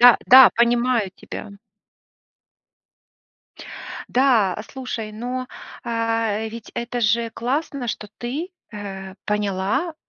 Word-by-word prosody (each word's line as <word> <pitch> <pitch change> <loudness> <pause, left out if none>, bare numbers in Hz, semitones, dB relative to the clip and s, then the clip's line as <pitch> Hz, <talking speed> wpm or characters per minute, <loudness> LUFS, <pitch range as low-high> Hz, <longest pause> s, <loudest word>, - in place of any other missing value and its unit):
Да 245 -1 +9
да, 260 0 +10
понимаю 235 -3 +2
тебя. 210 - -8 2.6
Да, 240 -8 +3
а, - - -6
слушай, 230 -4 -6
но, 250 +3 -4 0.4
а 225 -2 0
ведь 225 0 -9
это 240 +1 -3
же 230 +1 +2
классно, 265 +3 -2
что 210 -1 -4
ты, 285 +10 -4 0.2
э, 195 -2 -7
поняла 210 - 0
235 Hz, 100 wpm, -22 LUFS, 210-250 Hz, 2.6 s, да